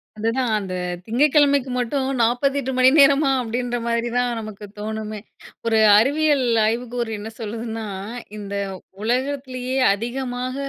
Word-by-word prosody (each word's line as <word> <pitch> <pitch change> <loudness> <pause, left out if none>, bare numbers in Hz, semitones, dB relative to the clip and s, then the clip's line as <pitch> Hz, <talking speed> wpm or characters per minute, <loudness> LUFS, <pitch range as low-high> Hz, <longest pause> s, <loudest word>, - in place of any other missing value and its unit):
அதுதான், 230 +2 -1
அந்த 190 -2 -6 0.3
திங்கட்கிழமைக்கு 280 +1 +3
மட்டும், 260 +2 -1
48 265 +3 +1
மணி 255 0 +6
நேரமா? 280 0 +5
அப்படின்ற 245 +1 -2
மாதிரி 235 0 0
தான் 245 0 +2
நமக்கு 215 -1 -8
தோணுமே. 215 0 -4 0.5
ஒரு 225 -1 +3 0.2
அறிவியல் 285 +2 +3 0.2
ஆய்வுக்கூறு 235 0 -2
என்ன 220 +2 -6
சொல்லுதுன்னா, 225 0 -5 0.5
இந்த 200 -1 -7 0.5
உலகத்திலேயே 255 +1 -2 0.2
அதிகமாக, 250 +3 -4
245 Hz, 110 wpm, -22 LUFS, 225-265 Hz, 0.5 s, மணி